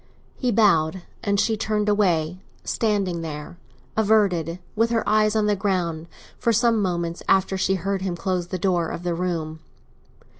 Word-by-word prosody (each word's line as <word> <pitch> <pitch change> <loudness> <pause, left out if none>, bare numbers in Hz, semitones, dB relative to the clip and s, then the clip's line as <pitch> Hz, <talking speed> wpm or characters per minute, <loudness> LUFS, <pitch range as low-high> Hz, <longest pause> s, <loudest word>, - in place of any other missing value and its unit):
He 250 -2 0
bowed, 190 -5 +3 0.2
and 200 -1 +1
she 225 +1 +2
turned 210 0 -1
away—standing 185 0 0
there, 155 +2 -7 0.4
averted, 200 -6 +2 0.2
with 225 +1 +2
her 230 -1 0
eyes 215 0 +3
on 215 -1 +2
the 210 0 +2
ground, 175 -5 -1 0.3
for 235 - +2
some 230 0 +3
moments 170 -3 -2
after 190 0 +3
she 190 0 +1
had 180 - -6
heard 195 -1 -1
him 185 -2 -2
close 180 -1 -2
the 185 - -3
door 175 -2 +1
of 170 - -6
the 175 -1 -1
room. 165 -3 -3
190 Hz, 160 wpm, -23 LUFS, 170-210 Hz, 0.4 s, bowed